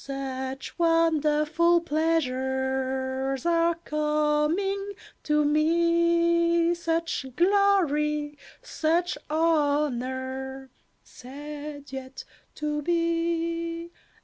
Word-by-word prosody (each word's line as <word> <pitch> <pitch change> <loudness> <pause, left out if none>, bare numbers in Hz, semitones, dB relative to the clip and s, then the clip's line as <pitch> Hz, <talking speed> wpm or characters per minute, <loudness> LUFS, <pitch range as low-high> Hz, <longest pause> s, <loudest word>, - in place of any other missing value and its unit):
"Such 270 +1 -5
wonderful 330 0 +3
pleasures 265 -4 -1
are 335 0 +2
coming 305 +7 0 0.3
to 300 -1 +1
me, 335 +2 +3
Such 330 -4 -2
glory, 310 -6 +2 0.3
such 335 +3 0
honour," 265 -4 -1 0.3
said 290 +2 -9
Yet 265 0 -7 0.3
to 300 0 -2
be. 335 0 -1
305 Hz, 65 wpm, -26 LUFS, 275-335 Hz, 0.3 s, wonderful